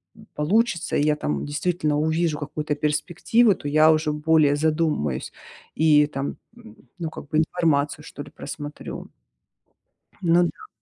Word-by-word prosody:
м, - - -16
получится, 190 +5 +1
и - - +2
я 150 0 +2
там 150 - -3
действительно 150 0 -1
увижу 160 0 0
какую-то 150 0 -3
перспективу, 175 +10 +2
то 145 - -8
я 155 +2 +5
уже 155 -1 +1
более 150 -1 +3
задумаюсь. 150 - -1 0.4
И 150 -2 +4
там, 135 -1 -4 0.6
ну 165 -2 -3
как - - -10
бы 155 - 0
информацию 155 -3 0
что 145 - -8
ли - - -14
просмотрю. 145 0 -8 1.1
Ну 175 -1 +4
да. 425 - -5
155 Hz, 140 wpm, -23 LUFS, 150-165 Hz, 1.1 s, я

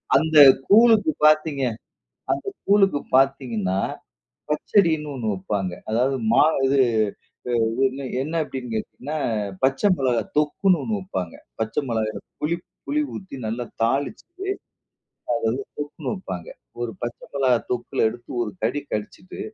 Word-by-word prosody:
அந்த 160 -1 +3 0.3
கூழுக்கு 225 +6 +6
பாத்தீங்க 155 -2 +4 0.7
அந்த - - -2 0.2
கூழுக்கு 195 -6 +4
பாத்தீங்கணா, 125 -8 +2 0.7
பச்சடினு 160 -1 +2
ஒண்ணு 120 -5 -4
வெப்பாங்க. 95 0 -2 0.2
அதாவது 125 +5 +2 0.2
மா 120 - +6 0.2
இது, 135 +1 +3 0.9
அ - - +1 0.2
இது 135 +1 -7 0.2
என்ன 155 +4 -4
அப்டினு 130 -4 -6
கேட்டீங்கனா 140 +7 -4 0.5
பச்ச 135 0 +2 0.2
மெளகாய் 120 -5 0
தொக்குணு 170 +5 +2
ஒண்ணு 220 - -2
வெப்பாங்க. 95 - -4 0.3
பச்ச 110 0 -2
மெளகாய்ல 110 -2 -1 0.2
புளிப் 170 +3 -1 0.2
புளி 300 +1 +1
ஊத்தி 190 -8 -8
நல்லா 115 +3 -2 0.2
தாளிச்சுட்டு, 180 - -2 0.9
அத 115 - 0
வந்து 130 +4 -2
தொக்குணு 145 0 -4
வெப்பாங்க. 90 - -7 0.3
ஒரு 120 -1 -3
பச்ச 120 0 -4 0.2
மிளகாய் 130 -4 +2
தொக்குல 120 -2 0
எடுத்து 120 +1 -12
ஒரு 105 -3 -4
கடி 130 +6 0
கடிச்சுட்டு, 110 - -5
135 Hz, 125 wpm, -23 LUFS, 115-160 Hz, 0.9 s, கூழுக்கு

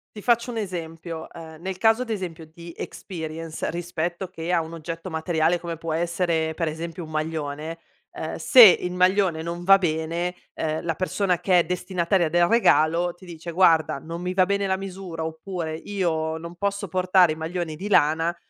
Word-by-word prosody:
Ti 210 - -9
faccio 235 0 +2
un 235 - -4
esempio. 165 -4 -5
Ehm, 160 -1 -11
nel 190 +1 -4
caso 225 +3 +3
ad 250 - -5
esempio 180 -7 -4
di 170 +1 -11
experience 160 -3 -6
rispetto 175 +1 -3
che 165 0 -5
a 175 - +3
un 160 0 -5
oggetto 165 +2 -6
materiale, 160 +1 +1
come 170 -1 -5
può 165 0 -4
essere 170 -1 0
per 165 - -1
esempio 165 +2 -5
un 155 - -10
maglione, 155 0 -3 0.4
ehm, - - -5
se 255 - +7
il 180 -3 +6
maglione 180 -2 +2
non 170 +1 -5
va 195 +2 +7
bene, 170 0 -1 0.2
ehm, 155 0 -2
la 165 -2 -1
persona 185 0 0
che 185 -2 +4
è - - +4
destinataria 180 0 0
del 175 +2 +3
regalo 175 -6 +3
ti 180 +2 -17
dice: 170 0 -7
"Guarda, 165 -5 +3
non 165 +4 -7
mi 180 0 -2
va 185 -1 +3
bene 200 0 0
la 190 -1 +1
misura," 190 -4 -6
oppure: 160 0 -4
"Io 160 -3 -2
non 170 +1 -8
posso 200 +2 -2
portare 185 -1 +3
i - - -8
maglioni 160 0 -4
di 190 +6 -6
lana, 165 -2 +3
170 Hz, 185 wpm, -24 LUFS, 160-185 Hz, 0.4 s, se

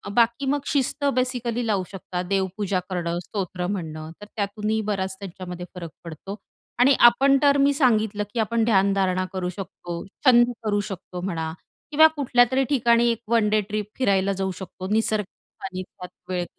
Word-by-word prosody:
बाकी 235 +3 +3
मग 285 +2 +1
शिस्त 280 +1 0
बेसिकली 245 -2 -1
लावू 200 -3 +1
शकतात. 180 -1 -5
देवपूजा 195 0 0
करणं, 175 -1 -2
स्तोत्र 180 -3 -4
म्हणणं. 160 -5 -5
तर - - -8
त्यातूनही 210 +1 -1
बराच 190 -2 -1
त्यांच्यामध्ये 180 -2 -7
फरक 170 -2 -6
पडतो 170 +5 -7 0.4
आणि 260 +3 +6
आपण 275 +3 +4
तर 285 -1 +5
मी 280 0 +4
सांगितलं, 220 -7 +2
की 235 - -2
आपण 225 +1 +1
ध्यानधारणा 195 -3 +2
करू 180 -1 -2
शकतो. 175 -2 -7 0.2
छंद 240 -1 +6
करू 205 -1 +1
शकतो 180 -1 -7
म्हणा 165 -4 -3 0.4
किंवा 315 +2 +7
कुठल्यातरी 260 -2 +3
ठिकाणी 240 -3 +3
एक 230 - -4
1 230 -2 +3
डे 215 - +3
ट्रिप 210 -1 -2
फिरायला 200 -5 +2
जाऊ 190 0 0
शकतो. 185 0 -7
निसर्गाच्या 215 -2 -2
सानिध्यात 185 -1 -8 0.2
वेळ 180 -1 -1
205 Hz, 155 wpm, -24 LUFS, 185-240 Hz, 0.4 s, किंवा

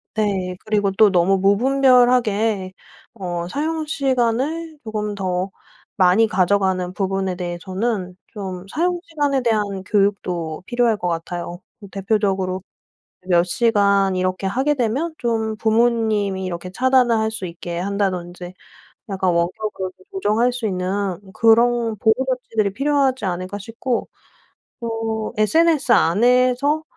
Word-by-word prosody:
네. 190 -4 -1
그리고 205 -2 +1
또 210 +2 +5
너무 185 +1 +3
무분별하게 225 -2 +3 0.4
어 175 -5 -4
사용시간을 295 - -1
조금 210 -2 -3
더 185 -1 -2 0.4
많이 190 +4 +4
가져가는 190 -2 +1
부분에 190 -1 -1
대해서는 185 +2 -3 0.2
좀 190 -4 -6
사용시간에 320 -5 0
대한 210 -5 -1
교육도 185 -5 -1
필요할 240 -1 +1
것 180 - -3
같아요. 175 +1 -4 0.3
대표적으로 195 -2 -1 0.7
몇 175 -2 +4
시간 200 -1 +2
이렇게 185 +1 -1
하게 265 +9 +1
되면 275 +6 -1
좀 220 -2 -1
부모님이 220 -4 +1
이렇게 180 0 -5
차단을 250 +1 +3
할 220 0 0
수 220 -3 -4
있게 170 0 -6
한다든지 180 -2 -3 0.5
약간 190 -2 0
'원격으로 185 +2 -2
좀 - - -22
조정할 245 - +1
수 245 -2 -3
있는 190 -1 -2
그런 230 +1 +3
보호 220 +2 +3
조치들이 225 -6 -1
필요하지 275 -2 +1
않을까.' 185 +2 -3
싶고 230 +4 -3 0.7
또 225 -1 -3
SNS 305 +5 +3
안에서 250 - +3
210 Hz, 275 characters per minute, -21 LUFS, 185-240 Hz, 0.7 s, 또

